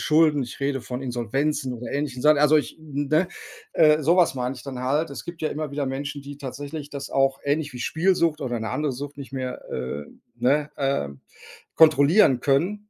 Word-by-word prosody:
Schulden, 155 -2 +4
ich 120 - -8
rede 140 -1 0
von 125 +1 -6
Insolvenzen 130 +3 -1
oder 120 +1 -7
ähnlichen 140 -3 -2
Sachen, 150 0 +6
also 150 +1 +5
ich 150 - -1
ne, 155 +3 0 0.5
äh, 155 0 +5
sowas 170 -1 +4
meine 125 +1 -2
ich - - -11
dann 130 -3 -6
halt. 145 +6 0
Es 140 - -7
gibt 170 0 -8
ja 155 - +1
immer 155 0 -4
wieder 140 -1 -2
Menschen, 140 +2 -4
die 140 0 -9
tatsächlich 145 +2 -6
das 140 -1 -6
auch 135 0 +2
ähnlich 145 0 0
wie 125 - -8
Spielsucht 165 +1 +1
oder 120 -4 -2
'ne 110 - -3
andere 150 -1 -1
Sucht 140 +3 -7
nicht 135 -1 -9
mehr, 130 -1 -4
äh 65 +3 -4 0.3
ne, 145 +3 +2
äh, 135 - 0 0.7
kontrollieren 155 - +6
können 185 +11 0
145 Hz, 190 wpm, -24 LUFS, 130-155 Hz, 0.7 s, Sachen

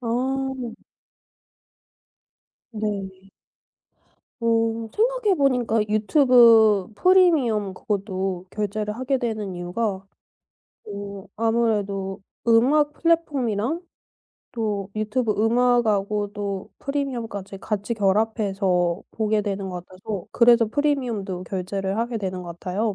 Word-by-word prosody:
아. 255 0 -2 1.9
네. 195 -3 -5 1.1
어 225 -1 +1
생각해 460 -3 +2
보니까 250 -6 +2
유튜브 220 - +5
프리미엄 280 - +3
그것도 190 -3 -3
결제를 210 +1 -3
하게 260 +2 0
되는 215 -6 -3
이유가 190 +3 -3 0.8
어 200 -1 -7
아무래도 205 -4 0 0.3
음악 290 +6 +4
플랫폼이랑 295 - 0 0.7
또 210 -4 -2
유튜브 215 +2 0
음악 245 +1 +3
하고도 205 -1 -2
프리미엄까지 235 -9 -4
같이 210 +2 -3
결합해서 195 -4 +1
보게 215 -1 0
되는 200 -1 -3
것 180 -1 -6
같아서 190 +1 -6
그래서 235 -1 +5
프리미엄도 235 -9 -1
결제를 195 +1 -3
하게 235 +1 -1
되는 185 -3 -4
것 170 -1 -9
같아요. 200 +4 -2
215 Hz, 235 characters per minute, -23 LUFS, 195-240 Hz, 1.9 s, 유튜브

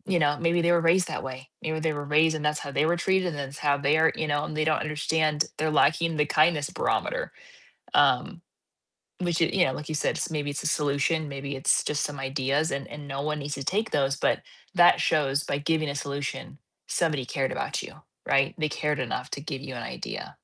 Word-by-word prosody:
you - - +4
know, 145 -1 +2
maybe 170 +1 +2
they 170 +1 +3
were 170 - +5
raised 175 +2 +4
that - - -3
way, 130 0 -7
maybe 155 0 -2
they 160 - +1
were 145 -1 -5
raised 155 +2 +4
and 150 -1 -3
that's 150 0 +1
how 140 - -6
they 140 +2 +2
were 170 +2 +2
treated, 190 +1 +1
and 160 -4 -3
that's 140 0 -5
how 145 -1 +2
they 145 +2 +2
are, 160 +1 +4
you 155 - -1
know, 145 0 0
and 155 - -6
they 155 - +1
don't 155 - +2
understand 150 0 +1
they're 155 +1 0
lacking 165 +2 +3
the 150 - +3
kindness 155 -1 +2
barometer. - - -1 0.6
Um, - - +3 0.8
which 175 -2 0
it 165 - +2
you 185 -2 +5
know, - - -1
like 150 - -7
you - - -2
said, 150 - 0
maybe 150 -2 -2
it's 145 - -4
a - - -3
solution, 150 +1 +1
maybe 140 0 -5
it's 135 - +2
just 150 -1 -1
some 145 -1 -4
ideas 135 +3 0
and 140 0 -4
and 145 -1 -9
no 135 0 -3
one 150 0 -2
needs 145 +1 -4
to 140 - -5
take 215 +3 0
those, 135 -1 +1
but - - +1 0.3
that 175 -2 +6
shows 140 -2 +2
by 140 - -1
giving 155 +1 0
a - - -4
solution, 140 0 -4 0.3
somebody 150 -7 0
cared 135 +1 -1
about - - -2
you, - - -9 0.3
right? 135 0 +2
They 155 -1 +1
cared 150 -1 -1
enough 125 0 -3
to 140 - -3
give 140 -3 -5
you 135 -3 -7
an 120 - -5
idea. - - -6
150 Hz, 230 wpm, -27 LUFS, 140-160 Hz, 0.8 s, that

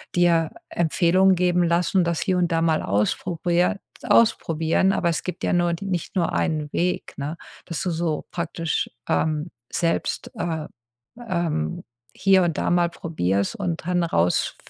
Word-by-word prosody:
dir 170 -2 +3 0.2
Empfehlungen 180 +3 +3
geben 180 0 +2
lassen, 175 +2 +2
das 170 -1 -1
hier 185 -3 +1
und 175 -1 +1
da 165 0 +2
mal 160 -1 +2
ausprobier 175 - 0 0.2
ausprobieren 165 -4 +3
aber 170 - 0
es 165 - -1
gibt 180 - -6
ja - - +1
nur 175 -1 +2
die 195 +4 -5
nicht 180 -4 -3
nur 170 -2 +1
einen 155 -2 -1
Weg, 180 +1 -1
ne, 150 +4 -4 0.3
dass 170 - -4
du 185 - -1
so 160 -2 -2
praktisch, 165 -2 -2 0.2
ähm, 155 +1 0 0.2
selbst, 165 -1 -1
äh, 160 -3 -3 0.6
ähm, 165 - -1 0.3
hier 190 -1 +4
und 165 -3 -1
da - - 0
mal 175 -1 +3
probierst 100 - -1
und 175 -5 -3
dann 180 -1 +1
rausf 90 - +1
170 Hz, 155 wpm, -23 LUFS, 160-180 Hz, 0.6 s, hier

